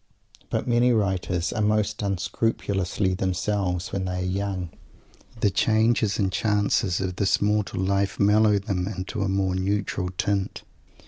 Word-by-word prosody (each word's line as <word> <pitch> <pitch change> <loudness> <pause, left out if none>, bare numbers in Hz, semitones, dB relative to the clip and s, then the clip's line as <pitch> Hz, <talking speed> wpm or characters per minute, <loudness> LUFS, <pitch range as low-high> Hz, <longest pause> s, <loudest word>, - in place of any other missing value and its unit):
But - - -2
many 120 +1 +3
writers 95 -5 0
are 110 - -1
most 105 0 +1
unscrupulously 95 0 -1
themselves 95 -1 -1
when 95 -1 -1
they 90 0 -2
are - - -2
young. 95 -2 -2 0.7
The 100 - +3
changes 110 +1 +2
and 95 -3 +1
chances 100 -3 +1
of 95 -1 -3
this 100 - +2
mortal 105 -2 0
life 100 0 0
mellow 105 +1 +4
them 95 -3 -2
into 100 +2 -4
a 100 - 0
more 95 -1 +1
neutral 95 -1 -1
tint. 100 -2 -1
100 Hz, 140 wpm, -25 LUFS, 95-105 Hz, 0.7 s, mellow